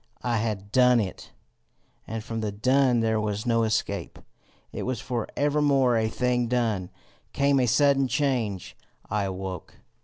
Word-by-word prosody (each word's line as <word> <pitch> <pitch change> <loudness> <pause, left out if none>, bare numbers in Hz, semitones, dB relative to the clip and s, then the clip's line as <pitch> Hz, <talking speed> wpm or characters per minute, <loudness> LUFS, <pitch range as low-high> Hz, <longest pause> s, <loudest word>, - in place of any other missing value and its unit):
I 120 -2 0
had 105 -3 -3
DONE 125 -1 +5
it, 100 -4 -5 0.8
and 110 -1 -5
from 115 0 -4
the 105 -1 -2
done 125 +3 +2
there 110 -1 +1
was 105 +1 -3
no 115 -1 +2
escape: 110 -4 -2 0.5
it - - -5
was 125 -3 -2
for 120 -2 -3
evermore 140 -4 +2
a 110 -1 +1
thing 125 0 0
done. 115 -7 -1 0.4
Came 140 0 +2
a 125 - +2
sudden 140 +2 +3
change: 125 - -1 0.4
I 105 -1 0
awoke. 95 -1 -6
115 Hz, 150 wpm, -26 LUFS, 105-130 Hz, 0.8 s, DONE